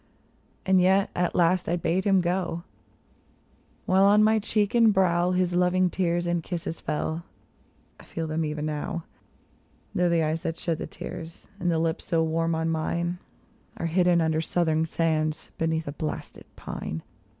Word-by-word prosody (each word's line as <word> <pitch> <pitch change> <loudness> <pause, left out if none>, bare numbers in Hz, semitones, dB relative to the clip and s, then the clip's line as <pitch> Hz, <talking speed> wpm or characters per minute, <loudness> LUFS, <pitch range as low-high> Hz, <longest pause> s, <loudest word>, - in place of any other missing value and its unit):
And 190 -1 +4
yet 190 +2 +3
at 175 -1 0
last 175 0 +2
I 175 - +2
bade 175 +2 0
him 195 -2 +4
go, 175 -1 -1 1.2
while 190 +1 +4
on 205 +1 +6
my 220 +1 +4
cheek 210 -1 0
and 230 -2 +6
brow 180 -3 +2
His 180 -1 +1
loving 180 0 +2
tears 175 -2 0
and 175 -1 0
kisses 170 -1 -5
fell; 160 +2 -2 0.8
I - - -13
feel 165 - -4
them 160 +1 -1
even 150 -1 -3
now, 155 +2 -3 0.9
Though 180 0 +2
the 170 -1 +2
eyes 155 +1 -1
that 165 0 -3
shed 165 -2 -2
the - - -4
tears, 165 0 -8
and 175 - 0
the 165 - +2
lips 165 0 -1
so 165 -1 +1
warm 165 +1 0
on 160 0 -1
mine 170 +2 -1 0.6
Are - - -3
hidden 175 +1 +3
under 160 -1 +1
southern 160 -1 +1
sands, 155 -1 -1
beneath 160 -1 0
a - - -2
blasted 155 +1 -5
pine 80 - -6
170 Hz, 165 wpm, -26 LUFS, 160-180 Hz, 1.2 s, on